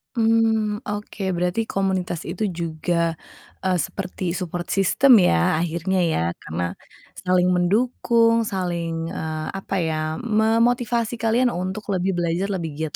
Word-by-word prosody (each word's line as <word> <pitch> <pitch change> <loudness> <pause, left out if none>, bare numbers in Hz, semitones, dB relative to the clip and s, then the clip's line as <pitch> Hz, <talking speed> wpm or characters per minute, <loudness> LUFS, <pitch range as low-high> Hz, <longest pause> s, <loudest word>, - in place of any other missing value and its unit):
Mmm, 225 -2 +2
oke. 205 0 -5
Berarti 180 +6 -1
komunitas 190 -3 -1
itu 190 +4 -1
juga, 170 0 -1 0.5
eee, 185 -1 +2
seperti 180 -2 -4
support 175 -1 -4
system 220 +5 +5
ya 120 - +3
akhirnya 175 +3 -1
ya. 160 - 0 0.2
Karena 85 +2 -3 0.6
saling 180 0 +3
mendukung, 230 +4 +2
saling, 170 -4 -2
eee, 155 -1 -4
apa 195 0 -4
ya, 155 -1 -1
memotivasi 230 +1 +1
kalian 240 +3 +3
untuk 185 +4 -4
lebih 190 0 0
belajar 175 +3 0
lebih 170 -5 -3
giat 160 -2 -3
185 Hz, 125 wpm, -23 LUFS, 170-220 Hz, 0.6 s, system